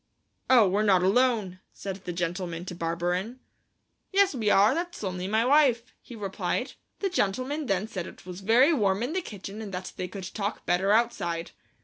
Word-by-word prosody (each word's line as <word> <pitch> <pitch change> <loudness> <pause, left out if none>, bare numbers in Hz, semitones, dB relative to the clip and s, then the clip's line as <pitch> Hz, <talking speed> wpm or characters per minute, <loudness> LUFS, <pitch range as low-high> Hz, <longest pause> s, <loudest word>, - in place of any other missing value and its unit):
"'Oh, 240 -6 +7
we're 195 +3 +1
not 190 -4 +4
alone,' 210 -3 +2
said 195 -1 -6
the 180 - -3
gentleman 175 0 -3
to 180 - -6
Barberin. 175 +7 -2 0.7
"'Yes, 395 -2 +4
we 225 -5 0
are; 205 +1 +5
that's 345 -4 -4
only 185 -1 -3
my 220 +3 +2
wife,' 260 -4 +3
he 240 - -11
replied. 200 +4 -3 0.3
The 395 - +1
gentleman 260 - -1
then 195 +1 0
said 190 -6 -5
it - - -13
was 180 +1 -8
very 240 - +5
warm 205 -5 +1
in 260 +6 -2
the 375 - 0
kitchen 205 - -8
and 210 -3 -7
that 185 +1 -6
they 180 - -3
could 190 0 -8
talk 205 -1 -3
better 180 +3 +2
outside. 190 -7 0
200 Hz, 185 wpm, -27 LUFS, 180-245 Hz, 0.7 s, Oh